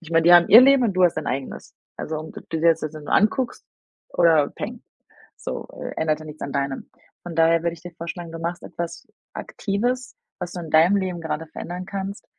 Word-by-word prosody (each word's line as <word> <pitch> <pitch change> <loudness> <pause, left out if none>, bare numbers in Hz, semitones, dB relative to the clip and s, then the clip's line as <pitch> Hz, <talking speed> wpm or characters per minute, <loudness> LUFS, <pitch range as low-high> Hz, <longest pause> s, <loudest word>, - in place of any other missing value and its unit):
ich 170 -3 -13
meine, 165 0 +4
die 175 - +7
haben 175 0 +7
ihr 225 - +10
Leben 270 -1 +5
und 210 -5 0
du 185 0 +4
hast 175 - +2
dein 155 - -3
eigenes. 135 +1 -5 0.2
Also, 160 - -4
um 155 +1 -7
ob - - -12
du 160 - -2
dir 165 +1 +6
das 165 0 0
jetzt 155 0 -4
nur 150 -1 -6
anguckst 235 +4 +1 0.5
oder 160 -4 +4
peng, - - -7 0.5
so, - - -6 0.3
ändert 155 -1 0
ja 155 - -10
nichts 150 0 -10
an 140 - -4
deinem. 140 -1 -3 0.3
Von 175 - -7
daher 165 +1 +4
würde 170 - +1
ich 165 - -16
dir 175 - -8
vorschlagen, 170 0 -6
du 165 - -6
machst 170 +1 -4
etwas 170 -1 -6 0.3
Aktives, 245 +5 -3 0.2
was 175 0 -5
du 180 - -5
in 165 -2 -8
deinem 165 +5 +5
Leben 185 -3 -2
gerade 160 0 -4
verändern 175 +3 -6
kannst, 195 +1 -6
170 Hz, 225 wpm, -23 LUFS, 160-185 Hz, 0.5 s, ihr